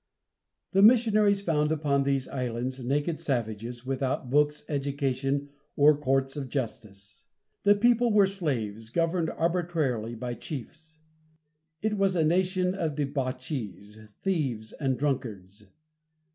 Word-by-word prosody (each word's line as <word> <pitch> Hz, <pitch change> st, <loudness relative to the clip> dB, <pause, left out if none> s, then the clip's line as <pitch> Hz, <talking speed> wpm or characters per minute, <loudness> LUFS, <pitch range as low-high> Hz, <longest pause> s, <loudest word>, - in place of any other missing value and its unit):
The 195 Hz, -, +4 dB
missionaries 215 Hz, -3 st, +5 dB
found 150 Hz, -5 st, +1 dB
upon 145 Hz, -3 st, +1 dB
these 135 Hz, -1 st, 0 dB
islands 125 Hz, +1 st, -3 dB
naked 145 Hz, +6 st, -1 dB
savages, 120 Hz, -1 st, -3 dB
without 130 Hz, -1 st, -2 dB
books, 150 Hz, +1 st, +2 dB
education, 140 Hz, -1 st, -1 dB, 0.3 s
or 145 Hz, +1 st, +6 dB
courts 135 Hz, -1 st, 0 dB
of 140 Hz, -3 st, -5 dB
justice. 110 Hz, -6 st, -6 dB, 0.4 s
The 205 Hz, 0 st, +7 dB
people 240 Hz, +2 st, +3 dB
were 205 Hz, -2 st, +6 dB
slaves, 120 Hz, -, -3 dB
governed 165 Hz, +4 st, 0 dB
arbitrarily 160 Hz, -10 st, -1 dB
by 120 Hz, +1 st, -4 dB
chiefs. 160 Hz, +5 st, -8 dB, 0.9 s
It 215 Hz, -2 st, 0 dB
was 195 Hz, -1 st, +2 dB
a 165 Hz, -, +3 dB
nation 185 Hz, +2 st, +2 dB
of 165 Hz, -6 st, -2 dB
debauchees, 125 Hz, -, -4 dB, 0.2 s
thieves 135 Hz, -, -1 dB
and 135 Hz, -3 st, -1 dB
drunkards. 105 Hz, -8 st, -3 dB
140 Hz, 115 wpm, -28 LUFS, 125-170 Hz, 0.9 s, The